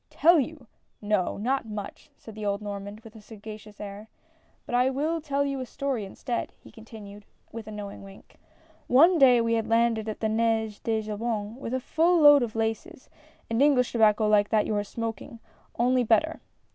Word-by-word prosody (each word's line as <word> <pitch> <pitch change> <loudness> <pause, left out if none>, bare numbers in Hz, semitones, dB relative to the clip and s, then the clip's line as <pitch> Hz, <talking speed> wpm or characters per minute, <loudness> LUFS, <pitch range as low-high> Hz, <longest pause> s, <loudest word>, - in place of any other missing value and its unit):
" - - -47
Tell 335 +1 +7
you? 295 -1 -4 0.3
no, 205 -3 -1
not 245 +3 -1
much! 210 -2 -8
" - - -43
said 220 - -12
the 215 0 -8
old 200 -1 -1
Normand 205 0 -7
with 225 0 -15
a 220 - -12
sagacious 215 0 -11
air, 210 +1 -8 0.6
"but - - -8
I 250 +2 +3
will 310 +5 -2
tell 280 -1 -1
you 275 -1 -3
a 255 - -4
story 265 -6 -3
instead," 235 +5 -4
he - - -16
continued, 210 -2 -12 0.3
with 225 -1 -8
a - - -7
knowing 205 -1 -8
wink: 195 0 -15 0.2
" - - -32
One 325 +7 +5
day 255 -3 +6
we 230 0 0
had 225 -1 0
landed 225 -1 +1
at 215 - -6
the 220 - 0
Nez 220 -1 0
de 220 -1 -1
Jobourg 215 +2 -4
a 260 - -1
full 335 +6 +2
load 290 -2 +8
of 230 -2 -3
laces, 225 +8 -4 0.4
and 230 +2 -1
English 275 -4 +3
tobacco 215 -2 +3
like 210 -1 +3
that 215 -1 +2
you 215 - -2
are 205 - 0
smoking, 230 +3 -6 0.4
only 250 +1 +2
better. 235 +8 +1
225 Hz, 195 wpm, -26 LUFS, 210-260 Hz, 0.6 s, load